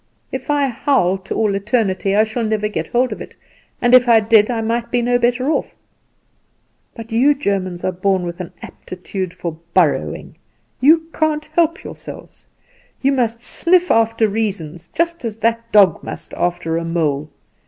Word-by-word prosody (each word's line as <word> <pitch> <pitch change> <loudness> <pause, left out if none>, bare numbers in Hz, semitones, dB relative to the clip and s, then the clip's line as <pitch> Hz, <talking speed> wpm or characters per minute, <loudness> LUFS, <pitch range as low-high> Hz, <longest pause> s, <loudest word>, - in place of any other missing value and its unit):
If 260 +1 -6
I 290 -1 +2
howl 240 -7 +1
to 190 - -6
all 215 -2 +1
eternity 200 -2 0
I 215 - +5
shall 220 +2 -3
never 215 -1 0
get 210 - -4
hold 250 +1 +1
of - - -6
it; - - -10 0.4
and 240 0 +2
if 250 -1 +7
I 230 -1 +7
did 220 0 +4
I 235 -2 -1
might 230 +1 -2
be 245 - +1
no 245 +1 +2
better 245 +4 +1
off. - - -2 1.2
But 230 0 -9
you 265 +6 +4
Germans 190 -9 -2
are 185 - 0
born 185 0 0
with 170 0 -6
an 180 - -6
aptitude 185 0 -6
for 165 -3 -6 0.2
borrowing; - - 0 0.4
you 320 +5 +5
can't 305 -1 0
help 335 +1 +1
yourselves. - - -10 0.6
You 275 - +4
must 235 -3 -1
sniff 360 +5 +2
after 225 0 +3
reasons, 185 -6 -3
just 335 -1 -2
as 225 -2 -4
that 230 +1 -1
dog 195 -6 +5
must - - -8
after 165 -2 -1
a 165 - -2
mole. 155 -3 -1
225 Hz, 170 wpm, -18 LUFS, 190-250 Hz, 1.2 s, if